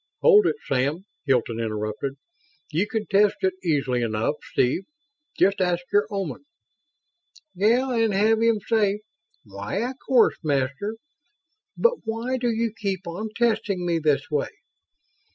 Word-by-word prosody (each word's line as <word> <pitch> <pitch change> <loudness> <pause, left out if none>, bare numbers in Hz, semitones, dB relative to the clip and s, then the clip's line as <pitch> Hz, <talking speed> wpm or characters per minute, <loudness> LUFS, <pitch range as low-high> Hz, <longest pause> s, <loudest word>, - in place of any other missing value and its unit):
"Hold 420 -5 +6
it, - - +1
Sam," 145 +8 0 0.2
Hilton 120 -3 +1
interrupted. 110 +4 -3 0.6
"You 175 +7 +1
can 220 0 -2
test 205 0 +3
it 190 -1 +2
easily 140 -7 +1
enough, 110 +3 0
Steve. 130 +9 0 0.5
Just 195 0 +3
ask 180 -1 +1
your 205 +1 +4
Oman." 195 - -4 1.1
"Yeah 240 +7 +2
and 225 -2 +2
have 220 +3 +3
him 230 -2 +3
say 210 -2 +1 0.4
'Why, 105 - -4
of 260 - -13
course, 250 -4 +4
Master, 140 +8 -1 0.8
but 475 0 +2
why 230 +3 -2
do 240 -1 0
you 230 -1 -1
keep 195 -4 -3
on 180 +6 -5
testing 220 -6 +1
me 170 -1 +1
this 150 -1 0
way?' 145 -2 0
195 Hz, 135 wpm, -24 LUFS, 140-225 Hz, 1.1 s, Hold